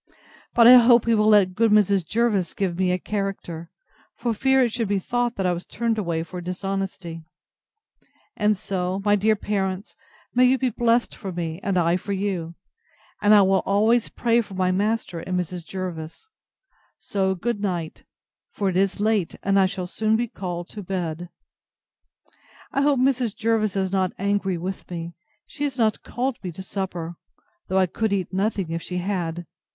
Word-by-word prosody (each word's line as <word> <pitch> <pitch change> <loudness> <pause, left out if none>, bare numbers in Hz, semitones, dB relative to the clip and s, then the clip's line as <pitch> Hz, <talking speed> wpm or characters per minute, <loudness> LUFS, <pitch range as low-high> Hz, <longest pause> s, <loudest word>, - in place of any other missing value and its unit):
But 235 - +7
I 250 +2 +11
hope 235 -1 +6
he 230 - +3
will 210 -1 +3
let 205 -4 +5
good 225 +4 +3
Mrs. 200 -3 +4
Jervis 205 0 0
give 190 -4 -1
me 185 0 +1
a 180 - +1
character, 190 -4 -4 0.5
for 235 -2 -1
fear 265 +3 +3
it 240 - +1
should 230 -1 -1
be 200 0 +1
thought 240 +5 -1
that 190 - -2
I 180 - +2
was 175 +1 -5
turned 230 -1 -1
away 170 -4 -1
for 180 +1 -7
dishonesty. 185 -2 -4 1.1
And 210 -1 +2
so, 185 0 -3
my 205 0 +5
dear 215 +2 +3
parents, 195 -1 -3 0.4
may 250 +1 +5
you 260 +1 +4
be 255 -1 0
blest 235 +1 +1
for 195 - -6
me, 170 -1 -4
and 195 -2 0
I 170 0 +3
for 200 +2 -4
you! 185 -4 -3 0.7
And 205 0 +4
I 205 - +7
will 190 0 +3
always 220 +4 +2
pray 235 0 +2
for 200 -4 -10
my 185 0 +1
master 205 -2 -1
and 180 +2 -2
Mrs. 180 0 -4
Jervis. 175 - -6 0.7
So 190 -1 -1
good 220 +4 -2
night; 175 -5 -3 0.5
for 200 -2 0
it 180 - -1
is 195 +1 +1
late, 210 -4 +1
and 195 0 +3
I 190 - +5
shall 185 -1 -4
be - - -9
soon 220 +4 +1
called 175 -3 -5
to 210 - -8
bed. 175 -3 -4 1.4
I 275 - +1
hope 285 -2 +3
Mrs. 250 -4 +1
Jervis 220 -3 0
is 190 -1 0
not 190 -2 0
angry 200 -2 0
with 185 +3 -6
me. 170 -1 -5 0.3
She 290 - -7
has 275 -3 -2
not 220 -3 +1
called 255 +1 -3
me 180 - -5
to 190 - -8
supper: 175 -4 -4 0.5
though 190 - 0
I 190 - +5
could 220 +4 -2
eat 190 -2 -1
nothing 195 -3 -1
if 165 0 -2
she 180 - -5
had. 175 -2 -2
195 Hz, 185 wpm, -24 LUFS, 180-220 Hz, 1.4 s, I